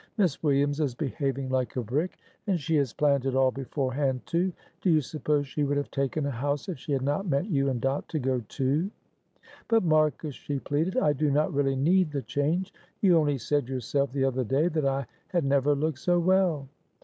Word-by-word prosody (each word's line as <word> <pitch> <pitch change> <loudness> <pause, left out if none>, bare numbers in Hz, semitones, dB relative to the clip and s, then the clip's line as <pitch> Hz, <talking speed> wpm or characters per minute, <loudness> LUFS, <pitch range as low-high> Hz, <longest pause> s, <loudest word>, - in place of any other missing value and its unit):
Miss 185 -9 +1
Williams 145 0 +2
is 140 -6 0
behaving 135 -1 -2
like 130 -1 -1
a 125 - -1
brick, 145 - -2 0.3
and 190 -4 +1
she 160 +2 -1
had 140 -5 +2
planned 140 -3 +2
it 130 - 0
all 130 -1 +4
beforehand, 135 0 -1
too. 180 +3 0 0.3
Do 185 - +1
you 160 -2 +5
suppose 150 0 -1
she 145 +2 -2
would 145 0 +1
have 145 - -3
taken 140 +2 -1
a 140 - -1
house, 140 +3 -2
if 180 -8 -5
she 150 - -7
had 135 -2 +1
not 145 +8 -1
meant 160 +6 0
you 140 -3 +2
and 125 -3 -1
Dot 135 +3 -1
to 160 - -2
go 130 -2 0
too?" 145 +8 0 0.8
"But, 225 -2 +3
Marcus," 155 -2 +2
she 145 +2 -4
pleaded, 155 - -1
"I 150 -12 +3
do 145 +2 0
not 150 +3 +1
really 135 -1 +1
need 170 +5 +3
the 140 -2 -3
change; 165 +7 -1 0.3
you 185 -4 +5
only 145 -3 +2
said 135 +2 -1
yourself 135 +1 -1
the 135 0 0
other 130 -1 0
day 140 +8 +1
that 155 -4 0
I 135 0 0 0.2
had 175 -5 0
never 140 +1 +3
looked 150 -1 -1
so 175 +4 +2
well." 175 -5 +2
145 Hz, 210 wpm, -27 LUFS, 135-155 Hz, 0.8 s, you